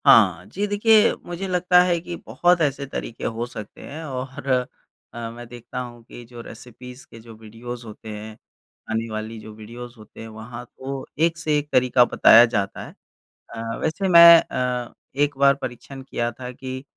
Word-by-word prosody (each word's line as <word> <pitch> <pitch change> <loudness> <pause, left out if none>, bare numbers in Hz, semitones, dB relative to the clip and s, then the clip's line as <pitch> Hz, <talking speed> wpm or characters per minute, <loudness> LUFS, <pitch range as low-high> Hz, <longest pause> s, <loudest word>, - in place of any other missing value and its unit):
हाँ, 90 -5 +6
जी 200 +2 -3
देखिए, 210 +1 +4
मुझे 175 +2 -5
लगता 180 0 +4
है 175 -1 +1
कि 175 0 -6
बहुत 175 -1 +2
ऐसे 140 -2 0
तरीके 120 -3 -7
हो 115 +1 -2
सकते 110 -4 -10
हैं 155 +3 -8
और 135 -1 -6 0.7
अ, 115 -1 -5
मैं 120 +1 -10
देखता 120 +1 -8
हूँ 120 -2 -8
कि 120 +1 -12
जो 120 0 -11
रेसिपीज़ 125 +3 -12
के 115 - -12
जो 115 0 -13
वीडियोज़ 115 +2 -9
होते 110 0 -11
हैं, 105 +1 -8 0.5
आने 115 +1 -2
वाली 110 +1 -5
जो 110 0 -11
वीडियोज़ 120 +3 -10
होते 110 0 -14
हैं 115 - -8
वहाँ 110 +2 -9
तो 130 +2 -7 0.2
एक-से-एक 155 -3 -1
तरीका 125 -1 +4
बताया 115 0 +7
जाता 100 -4 -3
है। - - -11 0.6
अ, 115 0 -5
वैसे 160 +5 -1
मैं 170 -1 +10
अ, 125 -1 -3 0.2
एक 145 0 0
बार 140 0 +5
परीक्षण 125 +2 -7
किया 120 -3 -3
था 125 +2 -8
कि 130 +1 -7
125 Hz, 175 wpm, -23 LUFS, 115-145 Hz, 0.7 s, मैं